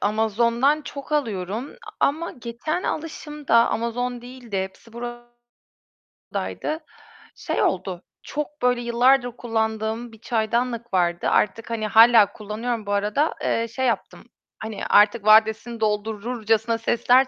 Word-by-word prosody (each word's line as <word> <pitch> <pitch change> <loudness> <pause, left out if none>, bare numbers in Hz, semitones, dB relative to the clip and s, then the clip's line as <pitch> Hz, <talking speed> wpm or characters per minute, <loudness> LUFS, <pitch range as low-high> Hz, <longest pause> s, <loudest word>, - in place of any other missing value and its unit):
Amazon'dan 235 +7 +2
çok 280 +1 -8
alıyorum 225 -3 -2 0.3
ama 320 +4 +1
geçen 245 +9 -4
alışımda, 300 -4 -3 0.2
Amazon 245 +2 -2
değildi, 245 -5 -6
Hepsiburada'ydı. 240 +4 -10 1.8
Şey - - -2
oldu, 185 -1 -1 0.2
çok 300 0 -5
böyle 245 -1 +2
yıllardır 245 +2 +3
kullandığım 220 0 -2
bir 225 - -15
çaydanlık 235 0 -1
vardı. 175 -2 +1
Artık 225 +3 +1
hani 220 -2 -2
hâlâ 225 -1 +6
kullanıyorum 220 +2 -4
bu 205 - -4
arada, 210 +10 +1
eee, 230 0 0
şey 260 +3 -3
yaptım. 235 - -2 0.4
Hani, 220 -1 -5
artık 210 +1 +5
vadesini 220 +2 +4
doldururcasına 220 +1 0
sesler 245 +3 +3
235 Hz, 110 wpm, -23 LUFS, 220-245 Hz, 1.8 s, hâlâ